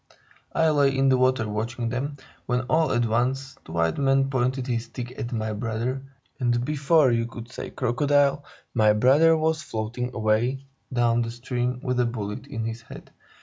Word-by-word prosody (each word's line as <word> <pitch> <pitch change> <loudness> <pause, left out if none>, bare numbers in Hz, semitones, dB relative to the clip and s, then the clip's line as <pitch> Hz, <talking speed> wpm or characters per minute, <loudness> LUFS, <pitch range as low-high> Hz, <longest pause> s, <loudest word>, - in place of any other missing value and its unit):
"I 160 0 +4
lay 140 -2 +3
in 135 0 +3
the 130 - +4
water 130 -3 +2
watching 115 +3 -3
them, 140 +4 -3 0.3
when, 125 0 +1
all 155 +3 +1
at 120 -1 +2
once, 130 +4 -1
the - - -11
white 85 +4 +1
man 135 0 +2
pointed 130 0 0
his 120 -2 -2
stick 120 +1 -7
at 120 - -4
my 110 -2 -2
brother, 115 +4 -2 0.4
and 120 -1 +1
before 150 -1 +3
you 115 0 +1
could 120 +1 -10
say - - -6
'crocodile,' 145 +3 +1 0.3
my 110 -3 +4
brother 145 +9 +5
was 160 0 0
floating 120 +3 -4
away 115 +5 0 0.3
down 120 -1 +2
the 115 - -2
stream 125 +1 -3
with 125 -2 0
a 125 - +3
bullet 105 -3 -5
in 115 -1 -4
his 115 +1 -4
head. 115 - -12
125 Hz, 180 wpm, -25 LUFS, 115-135 Hz, 0.4 s, brother